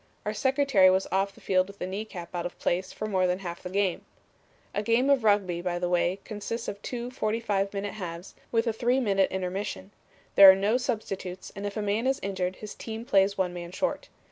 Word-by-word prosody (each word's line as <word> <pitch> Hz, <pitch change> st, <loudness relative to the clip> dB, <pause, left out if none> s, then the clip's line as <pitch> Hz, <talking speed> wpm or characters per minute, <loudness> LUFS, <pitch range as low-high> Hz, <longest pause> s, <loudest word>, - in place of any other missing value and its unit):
Our 210 Hz, -, -1 dB
secretary 265 Hz, -5 st, +4 dB
was 190 Hz, +1 st, +2 dB
off 195 Hz, +1 st, 0 dB
the -, -, -17 dB
field 185 Hz, -1 st, +2 dB
with 200 Hz, 0 st, -13 dB
a -, -, -2 dB
knee 195 Hz, +4 st, -4 dB
cap 175 Hz, -5 st, -9 dB
out 175 Hz, 0 st, -2 dB
of 175 Hz, -, -14 dB
place 185 Hz, +2 st, -1 dB
for -, -, -5 dB
more 190 Hz, -3 st, +1 dB
than 180 Hz, 0 st, +1 dB
half 175 Hz, -3 st, -6 dB
the 180 Hz, -, -6 dB
game. 195 Hz, -1 st, 0 dB, 0.7 s
A 205 Hz, -, 0 dB
game 230 Hz, +6 st, +3 dB
of 270 Hz, -4 st, +3 dB
Rugby, 200 Hz, -5 st, +2 dB
by 175 Hz, -1 st, -2 dB
the 175 Hz, 0 st, -1 dB
way, 175 Hz, +1 st, +1 dB
consists 230 Hz, +2 st, -5 dB
of 200 Hz, -, -5 dB
two 245 Hz, 0 st, -5 dB
45 215 Hz, -4 st, -1 dB
minute 200 Hz, 0 st, -4 dB
halves, 175 Hz, -3 st, -7 dB, 0.2 s
with 230 Hz, 0 st, +2 dB
a 230 Hz, -, 0 dB
three 245 Hz, +4 st, +1 dB
minute 195 Hz, -6 st, +2 dB
intermission. 190 Hz, +1 st, -4 dB, 0.4 s
There 195 Hz, -1 st, +11 dB
are 190 Hz, -, +9 dB
no 205 Hz, +5 st, +2 dB
substitutes, 195 Hz, -7 st, -4 dB
and 200 Hz, +1 st, -4 dB
if 205 Hz, -, -6 dB
a 215 Hz, -, -1 dB
man 210 Hz, +5 st, 0 dB
is 270 Hz, +1 st, +1 dB
injured, 190 Hz, -2 st, -2 dB
his 210 Hz, +1 st, -8 dB
team 225 Hz, 0 st, -7 dB
plays 200 Hz, -4 st, +3 dB
one 185 Hz, -2 st, 0 dB
man 175 Hz, -1 st, -7 dB
short. 275 Hz, +9 st, -2 dB
200 Hz, 220 wpm, -28 LUFS, 185-220 Hz, 0.7 s, There